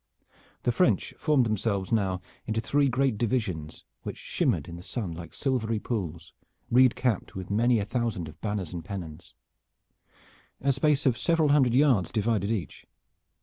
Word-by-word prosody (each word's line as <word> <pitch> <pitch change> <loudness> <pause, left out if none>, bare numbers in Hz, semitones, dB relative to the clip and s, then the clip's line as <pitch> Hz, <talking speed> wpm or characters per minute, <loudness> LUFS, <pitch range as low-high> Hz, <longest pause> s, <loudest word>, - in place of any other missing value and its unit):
The 120 - +2
French 180 +10 +2
formed 150 -5 +2
themselves 105 -2 -1
now 95 -5 +1 0.3
into 110 0 0
three 140 +4 +2
great 130 -3 +1
divisions, 105 -11 -2 0.2
which - - -6
shimmered - - 0
in 85 - -7
the 85 - -9
sun 100 -1 -4
like 85 +1 -8
silvery 120 -5 -1
pools, 90 -6 -4 0.4
reed 125 0 +6
capped 120 -6 -1
with 95 0 -6
many 120 +3 +3
a 100 - 0
thousand 110 -7 -2
of 75 +1 -13
banners 105 -5 -3
and 85 -2 -5
pennons. 90 -4 -8 1.2
A 140 - +2
space 145 +2 +2
of 125 -3 +2
several 165 -3 +2
hundred 135 -5 +4
yards 130 - +4
divided 105 -2 0
each. 110 -6 -4
110 Hz, 155 wpm, -28 LUFS, 95-130 Hz, 1.2 s, reed